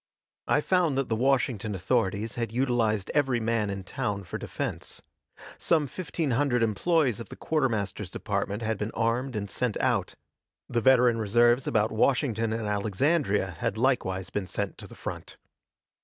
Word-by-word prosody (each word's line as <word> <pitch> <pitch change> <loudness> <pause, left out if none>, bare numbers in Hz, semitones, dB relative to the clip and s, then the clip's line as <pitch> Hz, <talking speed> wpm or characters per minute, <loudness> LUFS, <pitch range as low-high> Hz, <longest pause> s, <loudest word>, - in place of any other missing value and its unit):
I 150 - +3
found 175 -5 +2
that 135 - -1
the 110 - +1
Washington 120 -4 +1
authorities 100 +4 0
had 115 -2 -3
utilized 115 -5 +1
every 135 -5 +2
man 110 -2 0
in 100 -1 -4
town 100 0 -3
for 90 - -6
defense. - - -5 0.6
Some 160 -3 +2
fifteen 160 0 -3
hundred 125 -1 +2
employees 125 - +2
of 115 - -8
the - - -8
quartermaster's 115 - -1
department 105 +3 -3
had 110 -2 -1
been 105 - -2
armed 120 +3 0
and 100 -1 -2
sent 120 +2 -2
out; - - 0 0.5
the 120 - 0
veteran 125 -2 +5
reserves 120 +4 +3
about 110 0 +2
Washington 115 -1 +1
and 110 0 -2
Alexandria 105 - +1
had 110 - -1
likewise 105 -7 0
been 100 -3 -2
sent 100 +1 -4
to - - -9
the - - -13
front. - - -7
115 Hz, 155 wpm, -27 LUFS, 105-130 Hz, 0.6 s, veteran